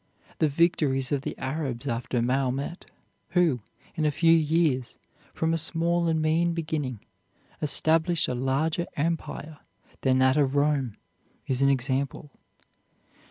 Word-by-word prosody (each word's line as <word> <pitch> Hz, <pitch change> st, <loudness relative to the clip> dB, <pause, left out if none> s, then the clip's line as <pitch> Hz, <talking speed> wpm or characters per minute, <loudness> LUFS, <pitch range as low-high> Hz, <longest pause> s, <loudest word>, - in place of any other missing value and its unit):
The 155 Hz, -, +4 dB
victories 145 Hz, -4 st, +1 dB
of 140 Hz, -2 st, +1 dB
the -, -, -5 dB
Arabs 135 Hz, -3 st, -3 dB
after 120 Hz, -1 st, -1 dB
Mahomet, 135 Hz, +6 st, -1 dB, 0.5 s
who, 165 Hz, -8 st, +3 dB, 0.3 s
in 160 Hz, -, -2 dB
a 150 Hz, -, +3 dB
few 165 Hz, +3 st, +3 dB
years, 155 Hz, -5 st, +1 dB, 0.3 s
from 160 Hz, 0 st, 0 dB
a 165 Hz, -, +1 dB
small 170 Hz, +1 st, +1 dB
and 160 Hz, -1 st, +1 dB
mean 165 Hz, +2 st, +1 dB
beginning, 150 Hz, -8 st, -3 dB, 0.6 s
established 160 Hz, +2 st, +2 dB
a -, -, -1 dB
larger 140 Hz, +7 st, 0 dB
empire 155 Hz, -1 st, -3 dB, 0.4 s
than 130 Hz, -1 st, +3 dB
that 130 Hz, +1 st, +4 dB
of 140 Hz, -2 st, +2 dB
Rome, 140 Hz, -6 st, +1 dB, 0.5 s
is 130 Hz, 0 st, -1 dB
an 140 Hz, -, +5 dB
example. 135 Hz, +2 st, -1 dB
150 Hz, 130 wpm, -27 LUFS, 130-165 Hz, 0.6 s, an